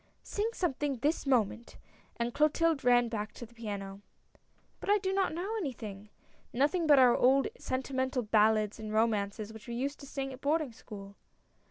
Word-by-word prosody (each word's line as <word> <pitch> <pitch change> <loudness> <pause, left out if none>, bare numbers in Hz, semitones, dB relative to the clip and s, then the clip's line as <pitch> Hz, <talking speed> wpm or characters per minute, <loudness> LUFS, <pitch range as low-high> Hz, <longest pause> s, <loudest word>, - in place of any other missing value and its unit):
" - - -42
Sing 420 +2 +1
something 290 - -1
this 290 +4 0
moment! 235 -2 0 0.2
" - - -32
and 235 0 -1
Clotilde 305 0 +2
ran 245 -1 +5
back 215 -2 -4
to 240 - -8
the 235 - -20
piano. 200 -4 -6 0.4
" - - -39
But - - -6
I 415 - +6
do 380 -1 -2
not 385 -1 +1
know 375 +7 -3
anything 215 - -6 0.2
— - - -34
nothing 295 +7 +1
but 290 -2 +7
our 250 -2 +6
old 270 +7 +4
sentimental 260 -1 -1
ballads 215 0 +3
and 215 -1 -6
romances 215 -1 0
which 220 +1 -12
we 235 - -4
used 275 +4 -3
to 280 - -10
sing 270 -1 -4
at 260 - -12
boarding 300 -2 +1
school." 200 -3 -11
250 Hz, 190 wpm, -31 LUFS, 220-290 Hz, 0.4 s, but